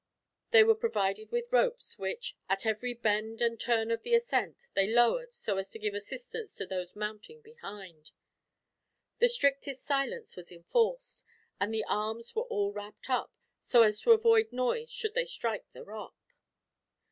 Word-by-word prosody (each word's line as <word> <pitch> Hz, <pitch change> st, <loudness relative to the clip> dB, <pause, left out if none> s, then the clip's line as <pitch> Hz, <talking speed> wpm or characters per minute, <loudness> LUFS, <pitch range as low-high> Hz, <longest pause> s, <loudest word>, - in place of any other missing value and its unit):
These 460 Hz, -2 st, +8 dB
were 450 Hz, -, +7 dB
provided 215 Hz, -, -1 dB
with 480 Hz, 0 st, -2 dB
ropes -, -, +1 dB
which, 480 Hz, 0 st, -4 dB
at 195 Hz, +3 st, 0 dB
every 220 Hz, +3 st, 0 dB
bend 220 Hz, 0 st, 0 dB
and 230 Hz, -1 st, +1 dB
turn 230 Hz, -1 st, +1 dB
of 230 Hz, -, 0 dB
the 475 Hz, -1 st, +2 dB
ascent, 475 Hz, 0 st, 0 dB
they 195 Hz, 0 st, +3 dB
lowered 240 Hz, -, +3 dB
so 210 Hz, -, -2 dB
as 195 Hz, 0 st, -3 dB
to 225 Hz, -, -9 dB
give 210 Hz, -2 st, -2 dB
assistance 445 Hz, -, -7 dB
to -, -, -4 dB
those 180 Hz, -1 st, -5 dB
mounting 215 Hz, -, -6 dB
behind. 200 Hz, -, -11 dB, 1.1 s
The 485 Hz, -, +6 dB
strictest 280 Hz, -, +1 dB
silence 295 Hz, -, -1 dB
was 180 Hz, -1 st, -9 dB
enforced, 465 Hz, -, -1 dB, 0.4 s
and 200 Hz, +2 st, 0 dB
the 220 Hz, -1 st, 0 dB
arms 220 Hz, +2 st, -2 dB
were 455 Hz, +2 st, -1 dB
all 205 Hz, -, -1 dB
wrapped 210 Hz, +4 st, -8 dB
up, 255 Hz, -, 0 dB, 0.3 s
so 235 Hz, -2 st, +5 dB
as 210 Hz, -1 st, +3 dB
to 470 Hz, -, +5 dB
avoid 455 Hz, 0 st, +5 dB
noise 255 Hz, -, -1 dB
should 435 Hz, -3 st, -3 dB
they -, -, +1 dB
strike 230 Hz, -, -4 dB
the -, -, -11 dB
rock. 215 Hz, +1 st, -9 dB
235 Hz, 165 wpm, -31 LUFS, -, 1.1 s, These